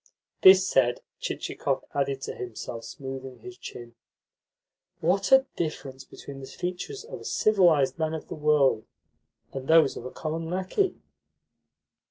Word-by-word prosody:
This 190 0 +8
said, 120 -2 +2 0.2
Chichikov - - -2
added 140 -1 -1
to - - -4
himself, 115 -1 -7
smoothing 130 -1 -7
his 370 -1 -10
chin: 120 - -10 1.1
"What 190 +4 +1
a 265 0 +7
difference 135 -5 -4
between 140 0 -10
the 135 - -8
features 180 - -5
of - - -8
a - - -10
civilised 175 -10 +3
man 160 0 0
of 160 - -7
the - - -6
world 150 -7 +2 0.7
and 135 0 -6
those 160 -3 +5
of - - -7
a - - -4
common 160 +4 -4
lacquey!" 190 - 0
150 Hz, 140 wpm, -27 LUFS, 135-185 Hz, 1.1 s, This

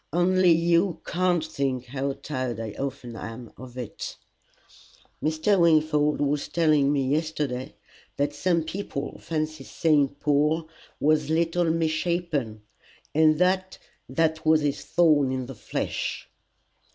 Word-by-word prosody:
Only 180 +1 +4
you 170 +2 +3
can't 175 -2 +1
think 135 -5 -2
how 135 +2 -2
tired 130 -4 -4
I 110 -2 -4
often 130 0 -5
am 115 +2 -8
of 130 0 -11
it." 125 -4 -6 1.1
"Mr. 160 +6 +2
Wingfold 155 -3 +3
was 145 0 0
telling 155 -4 +3
me 140 -2 +1
yesterday 145 -3 -2 0.4
that 145 +1 0
some 170 +2 +1
people 160 -4 -5
fancy 155 -1 -3
St. 145 -3 +1
Paul 150 +2 +1 0.3
was 150 0 +2
little 165 +2 +1
and 160 +1 +2
misshapen, 155 -8 -1 0.5
and 155 0 +4
that 185 +2 +1 0.3
that 160 -1 0
was 155 -1 +4
his 145 -1 -1
thorn 150 -6 +3
in 130 -1 -2
the 135 - -8
flesh." 110 - -4
155 Hz, 125 wpm, -26 LUFS, 140-165 Hz, 1.1 s, Only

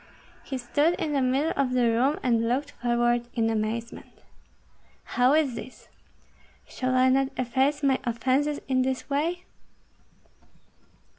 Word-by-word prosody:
He 265 - -5
stood 290 +7 +1
in 305 -3 -3
the 275 - +1
middle 265 +5 +1
of 270 -2 0
the 250 -1 +2
room, 240 +6 +2
and 230 -2 +1
looked 280 +4 -1
forward 240 0 0
in 225 -1 +1
amazement. 225 +1 -4 0.8
"How 250 +2 +2
is 300 -5 +2
this? 255 - -10 0.8
Shall 255 0 -2
I 255 0 +4
not 270 +1 +3
efface 265 +4 0
my 270 -2 +3
offences 260 +5 0
in 260 -1 +2
this 260 +2 -3
way?" 335 +6 -1
255 Hz, 135 wpm, -26 LUFS, 240-280 Hz, 0.8 s, I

